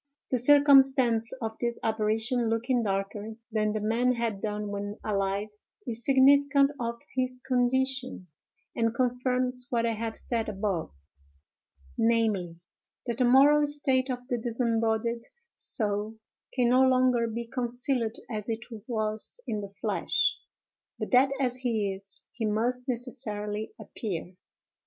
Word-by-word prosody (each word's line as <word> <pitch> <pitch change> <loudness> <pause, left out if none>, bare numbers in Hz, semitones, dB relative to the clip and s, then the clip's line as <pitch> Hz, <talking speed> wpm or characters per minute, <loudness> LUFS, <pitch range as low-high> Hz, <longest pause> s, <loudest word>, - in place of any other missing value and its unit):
The 255 - +2
circumstance 265 -4 +5
of 220 0 -4
this 235 -1 -1
apparition 225 +2 0
looking 240 +2 +1
darker 205 +1 -3 0.2
than 215 -1 +1
the 215 - -1
man 235 +4 +2
had 230 -4 -2
done 210 -1 -3
when 205 +1 -4
alive, 200 0 -1 0.4
is 235 -1 -4
significant 280 +1 +5
of 235 -1 -3
his 255 -1 -1
condition, 255 -3 0 0.5
and 230 0 0
confirms 250 0 0
what 235 -1 +1
I 230 - +1
have 225 0 -4
said 230 -3 -2
above, 195 -4 -2 1.1
namely, 215 -7 +1 0.5
that 235 -1 -3
the 250 - +4
moral 280 +4 +6
state 270 -3 0
of 250 -1 -4
the 245 -2 -1
disembodied 230 0 0 0.3
soul 210 -1 -1 0.4
can 245 -2 +2
no 255 +1 +5
longer 255 -2 +3
be 235 +1 -4
concealed 240 -1 -2
as 215 -2 -5
it 225 +1 -3 0.2
was 215 - -3
in 210 -1 -2
the 200 - -7
flesh, 200 - 0 0.6
but - - -5
that 260 +1 +6
as 250 -2 0
he 220 -6 -1
is, 195 0 -10
he 225 -3 -2
must 245 +4 -1
necessarily 215 -4 -4
appear. 185 -5 -5
235 Hz, 135 wpm, -28 LUFS, 215-255 Hz, 1.1 s, moral